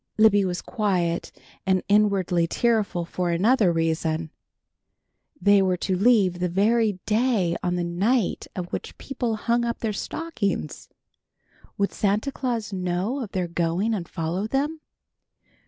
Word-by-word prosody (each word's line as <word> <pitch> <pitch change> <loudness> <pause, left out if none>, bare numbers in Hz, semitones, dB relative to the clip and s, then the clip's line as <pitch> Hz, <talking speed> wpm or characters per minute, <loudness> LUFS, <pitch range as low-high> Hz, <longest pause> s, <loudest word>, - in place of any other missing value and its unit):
Libby 215 -2 +5
was 180 -2 -2
quiet 180 -6 -1 0.3
and 185 -1 +1
inwardly 195 -5 +2
tearful 215 -4 0
for 180 +1 -2
another 195 +3 +3
reason. 160 -1 -1 1.1
They 205 -1 +5
were 185 -1 +1
to 185 +1 -1
leave 195 -3 +3
the 180 0 0
very 215 +4 +2
day 215 -6 +1
on 180 0 -1
the 175 - -1
night 195 +6 0
of 180 -2 -5
which - - -5
people 245 -4 -3
hung 235 +2 0
up 235 0 -3
their 220 -2 -1
stockings. 200 - -3 0.9
Would 200 0 0
Santa 210 +7 0
Claus 235 -7 -3
know 185 +7 -1
of 215 -5 -7
their 185 -2 -1
going 170 +6 0
and 175 -6 -4
follow 170 +5 -2
them? 295 +6 -1
200 Hz, 140 wpm, -24 LUFS, 175-225 Hz, 1.1 s, Libby